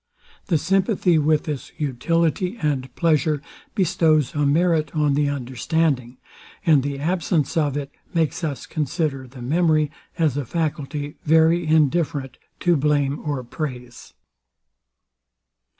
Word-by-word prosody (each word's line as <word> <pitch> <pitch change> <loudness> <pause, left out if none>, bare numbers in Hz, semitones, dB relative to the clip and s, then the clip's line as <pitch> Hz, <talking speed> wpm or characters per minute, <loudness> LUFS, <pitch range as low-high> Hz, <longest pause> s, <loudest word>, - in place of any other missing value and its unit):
The 170 - +3
sympathy 185 0 +2
with 150 0 +2
this 150 -4 -5
utility 165 - 0
and 135 -4 -1
pleasure 155 -2 +2 0.4
bestows 165 -7 +2
a 145 -1 +1
merit 160 0 +2
on 150 -2 +2
the 145 0 +2
understanding; 130 -1 -1 0.5
and 155 -5 +5
the 140 +1 -3
absence 160 -1 0
of 145 -4 +1
it 140 -1 -5 0.2
makes 165 -2 0
us 145 -4 -3
consider 150 -3 -2
the 125 -1 -11
memory 155 +1 +2 0.3
as 155 -5 +1
a 145 - -1
faculty 150 -1 -3
very 160 +2 +4
indifferent 150 -4 +1 0.2
to 175 -1 +3
blame 145 -1 +1
or 145 -4 -2
praise. 125 -2 -7
150 Hz, 120 wpm, -22 LUFS, 140-165 Hz, 0.5 s, and